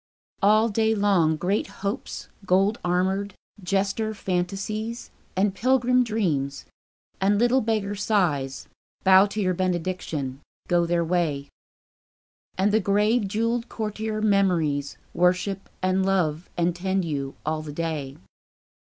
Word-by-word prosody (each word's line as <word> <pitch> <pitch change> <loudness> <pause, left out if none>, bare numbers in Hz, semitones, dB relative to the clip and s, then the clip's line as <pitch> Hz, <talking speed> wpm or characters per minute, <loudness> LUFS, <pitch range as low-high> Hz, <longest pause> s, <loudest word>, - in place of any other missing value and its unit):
All 215 +2 +5
day 220 +1 +2
long 190 -6 +3
Great 185 +6 0 0.2
Hopes 200 - -4 0.2
gold 195 +4 +3
armoured, 190 +3 0 0.3
jester 200 +4 -1
Fantasies, 200 +5 -3 0.3
And 195 +1 +2
pilgrim 250 +1 +3
Dreams, 160 - -1 0.6
and 200 +1 +3
little 240 +4 +3
beggar 215 -2 -1
Sighs, 175 -11 0 0.4
Bow 190 +1 +7
to 210 +2 -5
your 185 -3 +1
benediction, 170 -7 -2 0.3
go 175 -1 +2
their 170 0 +1
way. 160 -5 -1 1.1
And 195 +2 +2
the 220 - +4
grave 210 +3 +2
jewelled 230 +4 -1
courtier 215 0 -3
Memories 170 -9 +1 0.2
Worship 185 +3 +1
and 185 +1 +2
love 180 -4 0
and 170 0 +1
tend 190 +1 -1
you, 140 -4 -3
all 155 0 -1
the 155 -1 -7
day. 150 -3 -4
190 Hz, 120 wpm, -25 LUFS, 170-210 Hz, 1.1 s, Bow